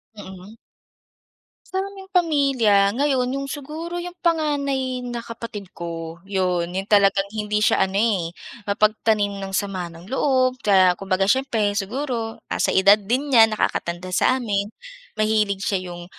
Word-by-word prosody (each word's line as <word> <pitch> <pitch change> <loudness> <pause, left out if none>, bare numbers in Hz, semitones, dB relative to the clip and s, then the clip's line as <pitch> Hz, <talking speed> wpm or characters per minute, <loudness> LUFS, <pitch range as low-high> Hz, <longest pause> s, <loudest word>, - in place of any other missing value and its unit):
Mm. 190 +1 -11 1.2
Sa 380 - +1
aming 390 -1 -8
pamilya, 270 - +3
ngayon 260 -1 0
yung 275 0 -3
siguro 310 +4 -6
yung 350 0 -5
panganay 280 -6 0
na 235 -1 -5
kapatid 230 -4 -8
ko, 165 0 -7
'yon, 185 -3 -1
yung 190 +2 -3
talagang 200 -1 +3
hindi 210 0 0
siya - - +3
ano, 195 - -2
eh, 200 -6 +1 0.4
mapagtanim 210 -1 +1
ng 195 - -5
sama 190 -4 -3
ng 170 +1 -13
loob 260 +1 +1
kaya 190 -3 +5
kumbaga 190 +1 -1
siyempre 220 -2 +1
siguro 225 +2 -3
nasa - - -1
edad 200 +2 +5
din 255 +7 -1
niya, 225 -1 +7
nakakatanda 185 -4 -2
sa 255 +7 +3
amin. 205 -4 -2 0.5
Mahilig 215 -2 +1
siya 185 -2 -1
yung 175 0 -8
210 Hz, 140 wpm, -22 LUFS, 195-260 Hz, 1.2 s, niya